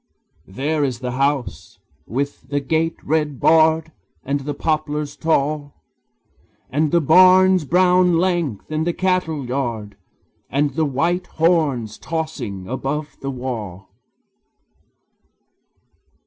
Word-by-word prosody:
There 145 +10 -1
is 130 -4 -1
the 125 0 -4
house, 135 0 -2 0.3
with 140 +5 -4
the 145 0 0
gate 160 +4 0
red 150 -3 -1
barred, 160 0 +4 0.3
And 140 +2 -1
the 145 +1 -5
poplars 150 -1 -2
tall; 150 -2 -1 1.0
And 150 +3 +1
the 170 - +4
barn's 185 +2 +5
brown 180 +1 +4
length, 170 - -1
and 155 +2 -1
the 175 - +1
cattle 180 -7 -1
yard, 120 -5 -3 0.5
And 145 +2 +1
the 160 -1 +1
white 170 +7 -1
horns 150 -10 0
tossing 155 - -4
above 140 +3 -4
the 135 - -3
wall. 115 -8 -6
150 Hz, 110 wpm, -20 LUFS, 135-165 Hz, 1.0 s, barn's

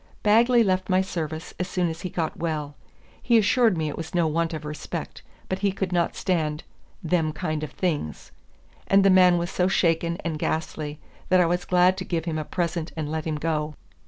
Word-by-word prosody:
Bagley 235 +3 +5
left 185 -2 0
my 185 0 +4
service 160 -3 -4
as 180 - -1
soon 180 -2 0
as 165 0 -5
he 185 - -4
got 165 -2 -2
well. 155 -3 -3 0.5
He 235 -2 +4
assured 225 -2 +3
me 155 -1 -1
it 150 - -4
was 165 +2 -6
no 170 -1 +3
want 165 +1 0
of 155 -2 -6
respect, 150 0 -6 0.3
but 185 - -2
he 200 0 +1
could 190 -1 -3
not 175 -1 +1
stand 155 -5 -1 0.4
"them 160 -2 +1
kind 155 0 -3
of 155 - -6
things;" 155 - -3 0.6
and 195 0 +5
the 195 - +6
man 180 -1 +6
was 175 +1 -2
so 180 - +1
shaken 170 -2 +1
and 160 -2 -2
ghastly 155 -2 -3 0.3
that 185 0 +5
I 180 - +5
was 175 +1 0
glad 180 +1 +4
to 190 - -3
give 170 -3 -2
him 160 -2 -2
a - - -2
present 170 0 -2
and 155 -1 -3
let 160 -1 -3
him 160 -1 -1
go. 150 0 -2
170 Hz, 210 wpm, -25 LUFS, 155-185 Hz, 0.6 s, the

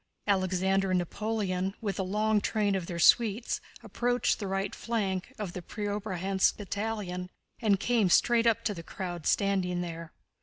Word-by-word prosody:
Alexander 190 0 +1
and 185 - +3
Napoleon, 195 0 -2
with 205 -3 -3
the 195 - 0
long 210 +2 +1
train 210 -2 +1
of 185 -3 -2
their 175 - -4
suites, 225 +5 +3 0.2
approached 245 0 0
the 205 - -3
right 195 +1 -2
flank 200 -3 -2
of 200 -5 -4
the 180 - -5
Preobrazhénsk 195 -1 -1
battalion 200 -3 -3 0.3
and 205 -4 +3
came 230 -5 +2
straight 235 +5 +4
up 230 - +2
to 210 - 0
the 170 - -7
crowd 175 -1 -5
standing 185 -3 +1
there. 165 -1 -6
195 Hz, 155 wpm, -29 LUFS, 185-215 Hz, 0.3 s, straight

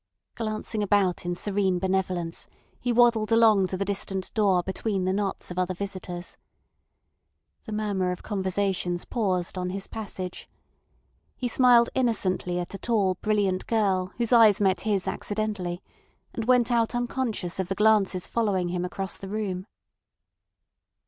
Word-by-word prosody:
Glancing 215 -1 -3
about 195 -4 +1
in 175 - -1
serene 195 -1 0
benevolence, 185 -2 -2 0.3
he 245 - -1
waddled 235 -2 +4
along 220 -4 +5
to 185 - -3
the 200 - -1
distant 195 -1 -3
door 195 -5 +3
between 190 +1 -2
the 185 - +1
knots 195 -2 -2
of 180 - -3
other 185 0 0
visitors. 185 -2 -6 1.3
The 220 - -7
murmur 205 -4 -1
of 180 - -6
conversations 190 -3 -1
paused 185 -6 -1
on 180 0 -2
his 195 +1 -4
passage. 190 -4 -6 0.9
He 250 - -2
smiled 240 -1 +5
innocently 190 -7 0
at 175 +1 -4
a 195 - -6
tall, 205 -6 +1
brilliant 200 -3 0
girl, 195 -5 +1
whose 235 0 0
eyes 220 -4 +7
met 190 -3 +2
his 205 -2 0
accidentally, 205 -4 -3 0.5
and 225 - -3
went 250 -1 +3
out 235 0 +2
unconscious 240 -7 -2
of 190 - -1
the 195 - -2
glances 205 -4 +3
following 200 -6 0
him 175 0 -2
across 190 +1 -4
the 195 - -8
room. 195 -2 -3
195 Hz, 145 wpm, -26 LUFS, 185-220 Hz, 1.3 s, eyes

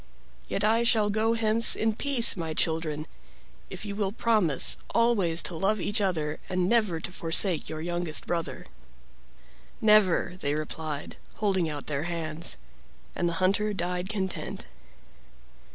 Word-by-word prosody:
Yet 200 - -2
I 225 +2 +3
shall 220 -3 +2
go 220 +2 +1
hence 225 0 +3
in 220 0 +1
peace, 250 0 +4
my 165 -3 -4
children, 160 -2 -1 0.6
if - - -8
you 200 -1 -5
will 200 -2 -1
promise 215 - +2 0.2
always 205 -8 +2
to 175 - -1
love 195 +5 0
each 205 +3 -1
other 155 -6 -1
and 180 -1 0
never 215 -7 +2
to 180 - -6
forsake 170 0 +1
your 155 0 -5
youngest 175 -1 -2
brother." 170 -1 -3 1.1
"Never!" 210 -5 +4
they 145 -2 -1
replied, 155 -1 -5 0.2
holding 190 -6 0
out 145 -2 -6
their 145 +1 -3
hands. 165 -1 -3 0.6
And 175 - 0
the - - -3
hunter 195 +4 +1
died 180 0 -2
content. 190 -4 -4
185 Hz, 140 wpm, -27 LUFS, 160-215 Hz, 1.1 s, peace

